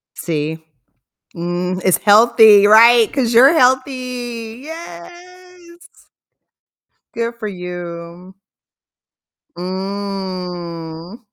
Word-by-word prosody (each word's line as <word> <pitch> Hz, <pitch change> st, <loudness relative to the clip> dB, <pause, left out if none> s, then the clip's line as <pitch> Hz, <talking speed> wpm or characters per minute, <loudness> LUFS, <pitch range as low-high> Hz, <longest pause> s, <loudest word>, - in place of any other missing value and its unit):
See? 160 Hz, -1 st, -4 dB, 0.8 s
Mm, 175 Hz, +2 st, -3 dB
it's 185 Hz, -, +2 dB
healthy, 215 Hz, -1 st, +5 dB
right? 230 Hz, +2 st, +5 dB
'Cause 245 Hz, -4 st, -1 dB
you're 260 Hz, +5 st, +6 dB
healthy. 250 Hz, -4 st, -2 dB
Yes! 345 Hz, -, -13 dB, 1.3 s
Good 230 Hz, 0 st, -4 dB
for 215 Hz, -, -5 dB
you. 175 Hz, -1 st, -9 dB, 1.2 s
Mm. 185 Hz, -2 st, -6 dB
205 Hz, 70 wpm, -17 LUFS, 180-245 Hz, 1.3 s, you're